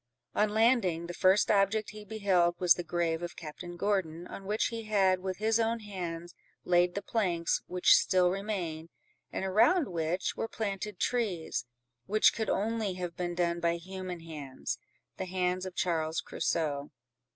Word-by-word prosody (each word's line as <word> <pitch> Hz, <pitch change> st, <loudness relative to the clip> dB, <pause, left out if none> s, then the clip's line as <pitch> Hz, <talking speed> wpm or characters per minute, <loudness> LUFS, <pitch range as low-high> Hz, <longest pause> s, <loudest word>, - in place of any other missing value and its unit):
On 210 Hz, 0 st, +2 dB
landing, 215 Hz, -6 st, +3 dB
the 175 Hz, -, -6 dB
first 190 Hz, +4 st, +4 dB
object 205 Hz, +1 st, +2 dB
he 215 Hz, 0 st, -10 dB
beheld 190 Hz, -5 st, +2 dB
was 180 Hz, -2 st, +6 dB
the 175 Hz, -, -5 dB
grave 170 Hz, -1 st, -1 dB
of 175 Hz, 0 st, -5 dB
Captain 175 Hz, +2 st, -8 dB
Gordon, 175 Hz, -4 st, -1 dB
on 195 Hz, -, -9 dB
which 210 Hz, +2 st, +1 dB
he 230 Hz, -1 st, -5 dB
had, 195 Hz, -3 st, +3 dB
with 185 Hz, -1 st, -4 dB
his 220 Hz, +2 st, +2 dB
own 230 Hz, 0 st, +1 dB
hands, 175 Hz, -4 st, -6 dB, 0.3 s
laid 175 Hz, 0 st, +3 dB
the 200 Hz, -, -3 dB
planks 180 Hz, -7 st, 0 dB
which 180 Hz, 0 st, +5 dB
still 180 Hz, -1 st, +3 dB
remained, 180 Hz, -5 st, -3 dB, 0.4 s
and -, -, -3 dB
around 240 Hz, -, +4 dB
which 170 Hz, +1 st, -1 dB
were -, -, -2 dB
planted 205 Hz, -3 st, -4 dB
trees, 205 Hz, -, -1 dB, 0.4 s
which 215 Hz, +2 st, +5 dB
could 220 Hz, -2 st, -2 dB
only 215 Hz, -2 st, 0 dB
have 175 Hz, -2 st, -5 dB
been 175 Hz, -1 st, -3 dB
done 170 Hz, -1 st, 0 dB
by 170 Hz, 0 st, +1 dB
human 185 Hz, 0 st, -6 dB
hands—the 155 Hz, +3 st, -7 dB
hands 185 Hz, 0 st, -1 dB
of 185 Hz, -, -9 dB
Charles 160 Hz, -2 st, 0 dB
Crusoe. 145 Hz, -3 st, -1 dB
185 Hz, 160 wpm, -30 LUFS, 170-210 Hz, 0.4 s, was